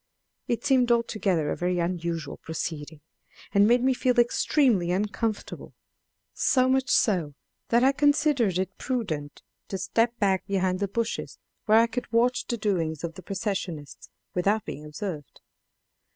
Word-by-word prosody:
It 235 Hz, -, -2 dB
seemed 255 Hz, -3 st, +3 dB
altogether 200 Hz, -9 st, +1 dB
a -, -, -1 dB
very 180 Hz, 0 st, -1 dB
unusual 170 Hz, -3 st, -2 dB
proceeding, 160 Hz, -1 st, -6 dB, 0.5 s
and 200 Hz, +1 st, +5 dB
made 245 Hz, +2 st, +4 dB
me 260 Hz, 0 st, +3 dB
feel 250 Hz, -1 st, +1 dB
extremely 240 Hz, -, +2 dB
uncomfortable; 210 Hz, +3 st, -3 dB, 0.6 s
so 255 Hz, -2 st, +2 dB
much 265 Hz, +1 st, +1 dB
so 175 Hz, -, +2 dB, 0.3 s
that 235 Hz, +1 st, +4 dB
I 265 Hz, -, +6 dB
considered 285 Hz, -, +2 dB
it 190 Hz, +1 st, -3 dB
prudent 165 Hz, -, -3 dB, 0.2 s
to 195 Hz, -, -4 dB
step 225 Hz, +5 st, 0 dB
back 195 Hz, -4 st, +1 dB
behind 185 Hz, -2 st, 0 dB
the 200 Hz, -, 0 dB
bushes, 230 Hz, +3 st, -3 dB, 0.3 s
where 215 Hz, +1 st, +6 dB
I 230 Hz, -, +6 dB
could 235 Hz, 0 st, -5 dB
watch 240 Hz, +2 st, +2 dB
the 235 Hz, -, -2 dB
doings 170 Hz, -8 st, -1 dB
of 170 Hz, -1 st, -3 dB
the 185 Hz, -, -11 dB
processionists 185 Hz, -, -5 dB, 0.2 s
without 200 Hz, +4 st, +1 dB
being 150 Hz, -, -7 dB
observed. 150 Hz, 0 st, -7 dB
200 Hz, 145 wpm, -26 LUFS, 175-240 Hz, 0.6 s, I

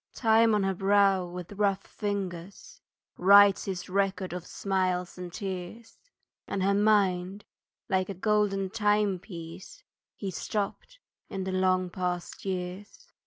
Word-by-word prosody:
Time 225 Hz, -1 st, +4 dB
on 205 Hz, -, +1 dB
her 195 Hz, 0 st, +1 dB
brow 195 Hz, -1 st, +3 dB
with 180 Hz, +1 st, -8 dB
rough 200 Hz, -1 st, 0 dB
fingers 200 Hz, -, -5 dB, 0.4 s
Writes 200 Hz, +1 st, +6 dB
his 190 Hz, -3 st, -4 dB
record 190 Hz, -1 st, -1 dB
of 180 Hz, -1 st, -6 dB
smiles 185 Hz, -2 st, -1 dB
and 180 Hz, -1 st, -7 dB
tears; 190 Hz, +4 st, -7 dB, 0.5 s
And 195 Hz, -, -2 dB
her 200 Hz, +1 st, +3 dB
mind, 200 Hz, -2 st, +2 dB, 0.4 s
like 190 Hz, -2 st, 0 dB
a 200 Hz, -, -4 dB
golden 195 Hz, -1 st, +1 dB
timepiece, 195 Hz, -5 st, -2 dB, 0.3 s
He 195 Hz, -2 st, -5 dB
stopped 210 Hz, -, -4 dB, 0.3 s
in 190 Hz, -1 st, -4 dB
the 190 Hz, -, -3 dB
long 185 Hz, -1 st, +1 dB
past 180 Hz, 0 st, -4 dB
years. 190 Hz, -, -5 dB
195 Hz, 125 wpm, -28 LUFS, 180-205 Hz, 0.5 s, Writes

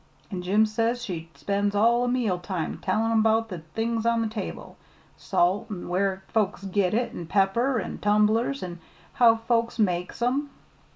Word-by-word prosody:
An' 185 Hz, -2 st, -3 dB
Jim 200 Hz, +5 st, +3 dB
says 230 Hz, +3 st, -1 dB
she 165 Hz, -3 st, -5 dB
spends 200 Hz, +8 st, -1 dB
all 235 Hz, +4 st, +4 dB
o' 245 Hz, -, +1 dB
meal 240 Hz, -8 st, 0 dB
time 175 Hz, -2 st, -4 dB
tellin' 220 Hz, +3 st, +1 dB
'bout 225 Hz, +1 st, +2 dB
the 180 Hz, -4 st, -5 dB, 0.2 s
things 225 Hz, 0 st, -1 dB
on 230 Hz, 0 st, +2 dB
the -, -, -1 dB
table, 215 Hz, -2 st, -6 dB, 0.4 s
salt, 195 Hz, +6 st, +1 dB
an' 190 Hz, -4 st, -6 dB
where 190 Hz, +1 st, 0 dB
folks 205 Hz, -3 st, 0 dB
git 195 Hz, 0 st, 0 dB
it, 240 Hz, +1 st, -1 dB
an' 170 Hz, -, -7 dB
pepper, 210 Hz, +8 st, +2 dB
an' -, -, -5 dB
tumblers, 210 Hz, +5 st, +2 dB
an' 175 Hz, -1 st, -6 dB, 0.3 s
how 235 Hz, -4 st, +6 dB
folks 230 Hz, +1 st, 0 dB
make 180 Hz, -5 st, 0 dB
'em. 265 Hz, +5 st, 0 dB
215 Hz, 170 wpm, -26 LUFS, 190-230 Hz, 0.4 s, how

